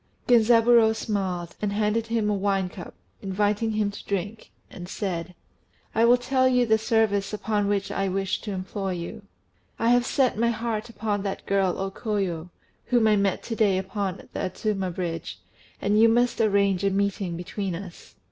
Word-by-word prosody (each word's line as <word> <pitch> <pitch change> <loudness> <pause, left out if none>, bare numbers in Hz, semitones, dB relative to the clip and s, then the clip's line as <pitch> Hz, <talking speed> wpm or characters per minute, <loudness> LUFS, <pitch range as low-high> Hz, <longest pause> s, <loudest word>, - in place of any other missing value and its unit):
Genzaburô 230 -1 +5
smiled, 185 -6 -3
and 210 -1 0
handed 215 +2 0
him 225 -2 0
a 210 - +2
wine 195 -2 0
cup, 180 - -10 0.3
inviting 205 +3 0
him 210 -1 0
to 200 - -10
drink, 200 +3 -4 0.2
and 175 0 -10
said 180 -3 -4 0.6
"I 225 - +4
will 245 +1 +6
tell 260 +1 +2
you 250 -1 +3
the 220 -1 +3
service 220 -3 +1
upon 210 -1 -1
which 200 -1 -1
I 195 - -1
wish 195 0 -1
to 210 - -5
employ 190 0 -3
you. 170 +2 -6 0.6
I 230 - +1
have 245 0 +3
set 255 -6 +1
my 235 0 +3
heart 230 -1 -3
upon 215 -3 -2
that 195 -1 -4
girl 195 -2 +1
O 195 0 -3
Koyo, 190 -6 -3 0.4
whom 240 -3 +2
I 215 - +5
met 200 -2 0
to 225 - -4
day 205 -4 +3
upon 190 0 -4
the - - -4
Adzuma 195 0 -2
Bridge, 170 -2 -4 0.4
and 205 +1 +2
you 230 - +7
must 240 +1 +2
arrange 200 -3 +2
a 200 - +3
meeting 195 -3 -1
between 185 +1 -4
us." 175 -1 -10
205 Hz, 175 wpm, -25 LUFS, 190-225 Hz, 0.6 s, you